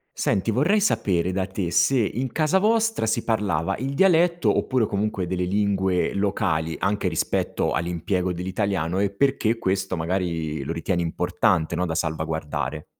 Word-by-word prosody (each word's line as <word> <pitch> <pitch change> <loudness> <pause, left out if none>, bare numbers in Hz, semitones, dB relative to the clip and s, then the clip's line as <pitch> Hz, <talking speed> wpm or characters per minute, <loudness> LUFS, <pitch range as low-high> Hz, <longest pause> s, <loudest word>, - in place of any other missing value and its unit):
Senti, 105 +3 0
vorrei 170 - +2
sapere 90 - +1
da 95 0 -1
te 95 -3 -3
se 135 +8 +3
in 120 +3 -1
casa 155 +4 +2
vostra 225 - +1
si 110 - 0
parlava 95 -5 0
il 135 +4 -3
dialetto 175 0 +3
oppure 130 -3 +1
comunque 100 -2 -2
delle 90 0 -1
lingue 95 -1 +1
locali, 80 -5 -1
anche 100 -1 0
rispetto 80 -3 -1
all’impiego 90 +2 -1
dell’italiano, 95 -1 -2
e 100 0 +2
perché 120 0 +1
questo 95 -3 -1
magari 80 -4 -2
lo 80 - -3
ritieni 85 +2 -1
importante, 85 0 0
no, 90 +1 0
da 80 - -3
salvaguardare. 80 -2 -3
95 Hz, 150 wpm, -24 LUFS, 85-110 Hz, -, se